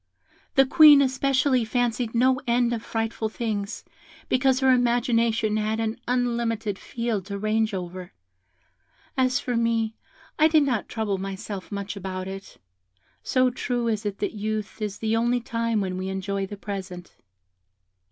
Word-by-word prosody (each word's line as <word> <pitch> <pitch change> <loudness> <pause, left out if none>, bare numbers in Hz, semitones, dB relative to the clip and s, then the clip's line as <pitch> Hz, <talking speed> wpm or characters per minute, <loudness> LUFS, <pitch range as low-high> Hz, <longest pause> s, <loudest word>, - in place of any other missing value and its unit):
The 270 - +6
Queen 300 +1 +8
especially 265 -1 +2
fancied 240 0 -1
no 260 +2 +3
end 240 0 +2
of 230 - -3
frightful 225 -1 -2
things, 215 -3 -3 0.5
because 260 0 +3
her 265 0 +5
imagination 235 -3 +2
had 215 +1 -1
an 225 0 -1
unlimited 235 -4 -1
field 230 -5 -3
to 200 -1 -4
range 215 +2 +1
over. 180 -1 -6 1.0
As 255 -1 +2
for 245 - -3
me, 230 -1 +1 0.5
I 310 - +7
did 315 -2 +4
not 250 -7 -1
trouble 210 -4 -2
myself 195 +1 -6
much 200 0 -4
about 185 -1 -5
it, 195 +1 -8 0.6
so 255 -1 +2
true 245 -1 -2
is 220 -2 -1
it 205 -2 -3
that - - -2
youth 215 0 -4
is 210 -1 -3
the 220 0 0
only 240 +2 +2
time 230 -2 -1
when 185 -1 -3
we 190 +1 -3
enjoy 195 +1 -2
the 205 - -8
present. 190 -3 -7
225 Hz, 150 wpm, -25 LUFS, 200-245 Hz, 1.0 s, Queen